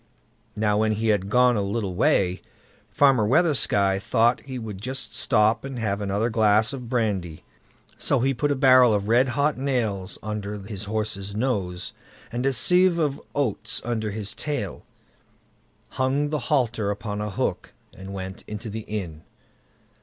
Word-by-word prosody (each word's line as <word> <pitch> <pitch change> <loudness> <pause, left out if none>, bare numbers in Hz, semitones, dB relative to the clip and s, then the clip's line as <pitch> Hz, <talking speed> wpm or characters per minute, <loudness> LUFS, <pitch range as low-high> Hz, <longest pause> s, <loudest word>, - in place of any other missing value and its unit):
Now 105 -1 +1
when 110 0 +2
he 110 +1 -1
had 100 -2 +1
gone 125 +1 +4
a 105 - 0
little 100 -1 -2
way, 90 0 +2 0.5
Farmer 135 -6 +4
Weathersky 105 - +3
thought 120 +4 +2
he 130 -2 -6
would 105 -5 -7
just 130 +4 -4
stop 110 -2 +2
and 135 -1 -6
have 105 -3 -2
another 100 +4 -1
glass 110 +2 +3
of 125 -4 -7
brandy; 100 -10 -2 0.6
so - - +2
he 135 +3 +1
put 145 +4 -1
a 145 - +1
barrel 130 -4 +6
of 100 0 -2
red 120 +4 +4
hot 145 -1 +1
nails 110 -8 -1
under 105 -1 -4
his 100 0 -7
horse's 105 -2 -3
nose, 100 -7 -2 0.4
and 120 +3 -1
a 135 - +2
sieve 180 +5 +4
of 150 -4 -1
oats 115 -5 -1
under 110 -3 -2
his 105 -1 -3
tail, 145 - -4 1.1
hung 135 +3 0
the 150 - 0
halter, 120 -8 +1
upon 105 0 -4
a 105 - -3
hook, 95 - -3 0.2
and 95 +1 -9
went 95 -1 -7
into 105 +1 -6
the 110 0 -6
inn. 90 -8 -5
110 Hz, 160 wpm, -24 LUFS, 100-130 Hz, 1.1 s, barrel